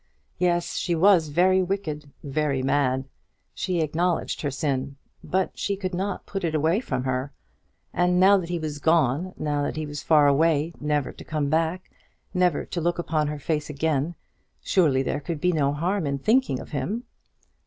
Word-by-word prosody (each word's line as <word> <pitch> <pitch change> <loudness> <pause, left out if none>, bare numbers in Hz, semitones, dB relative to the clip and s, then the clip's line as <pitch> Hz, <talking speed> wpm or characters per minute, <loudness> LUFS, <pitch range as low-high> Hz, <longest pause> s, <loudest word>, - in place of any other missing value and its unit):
Yes; 175 -1 +1
she 175 -2 0
was 175 -1 +5
very 185 +5 +3
wicked 170 -6 -3
very 140 -2 -1
mad. 135 -1 +1 0.5
She 180 -3 -1
acknowledged 165 +3 0
her 145 - -1
sin, 135 -1 -2 0.3
but 190 0 -1
she 200 - -1
could 190 -1 -4
not 190 +2 -3
put 195 -2 -5
it 160 -2 0
away 160 +6 +2
from 130 - -3
her. 130 +1 -2 0.6
And 180 +1 +2
now 195 +2 +7
that 175 -3 -4
he 175 - -1
was 155 -3 -4
gone, 160 +2 +2
now 145 -1 -1
that 145 - -2
he 155 0 -3
was 150 0 -6
far 150 -2 +5
away, 155 +2 +3
never 150 -2 0
to - - -12
come 150 -2 -2
back, 165 +4 0 0.4
never 180 -4 +2
to 175 - -4
look 170 +1 0
upon 155 -3 0
her 150 0 -3
face 150 +1 -2
again, 150 +2 -1 0.5
surely 145 -8 +3
there 140 - -1
could 150 +2 -4
be 180 +4 +2
no 145 -4 +1
harm 170 +3 -1
in 140 0 -1
thinking 220 - +2
of - - -10
him. 180 - -2
160 Hz, 180 wpm, -25 LUFS, 145-180 Hz, 0.6 s, now